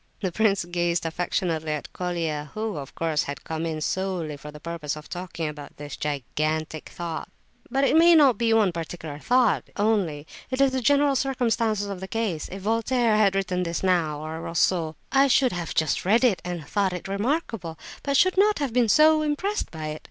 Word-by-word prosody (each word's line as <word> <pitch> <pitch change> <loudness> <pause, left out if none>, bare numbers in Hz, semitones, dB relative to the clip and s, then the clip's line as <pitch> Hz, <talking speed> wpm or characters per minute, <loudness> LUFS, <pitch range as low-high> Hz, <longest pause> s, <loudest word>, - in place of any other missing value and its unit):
The 190 -3 -2
prince 200 -2 +2
gazed 175 -1 -1
affectionately 165 -1 -1
at 150 - -6
Colia, 165 -4 -3
who, 215 -1 -2
of 140 -1 -8
course, 160 -2 0
had 140 -2 -6
come 160 +1 -3
in 155 -1 -3
solely 180 -3 -2
for 145 +1 -10
the 150 - -11
purpose 165 -2 -4
of 150 0 -10
talking 175 -3 -4
about 150 -1 -8
this 145 -1 -7
"gigantic 155 +2 -3
thought." 170 -2 -5 0.4
"But 270 +1 +1
it 275 - +3
is 335 +1 +7
not 270 -7 +5
any 230 -1 +3
one 220 -4 +4
particular 165 -3 -6
thought, 245 +4 +2
only; 200 -9 +1 0.2
it 260 0 -3
is 275 -1 +4
the 260 0 -1
general 285 +2 +3
circumstances 230 -5 0
of 200 -2 -5
the 190 - -6
case. 205 -8 -2
If 190 0 -7
Voltaire 230 +1 +2
had 205 -2 +3
written 185 -2 0
this 170 0 -2
now, 170 -5 +1
or 160 +1 -6
Rousseau, 165 -1 0 0.2
I 275 0 +5
should 260 -1 +4
have 175 -2 -4
just 160 -1 +1
read 220 +7 +3
it 230 -7 +3
and 175 -4 -5
thought 195 0 0
it 180 +1 -6
remarkable, 205 - -2 0.2
but 280 -1 +1
should 370 +4 +4
not 420 +1 +4
have 280 -5 -2
been 240 -2 +3
so 310 +4 +6
impressed 310 +8 -1
by 155 -2 -5
it. 155 0 -5
185 Hz, 195 wpm, -25 LUFS, 160-230 Hz, 0.4 s, is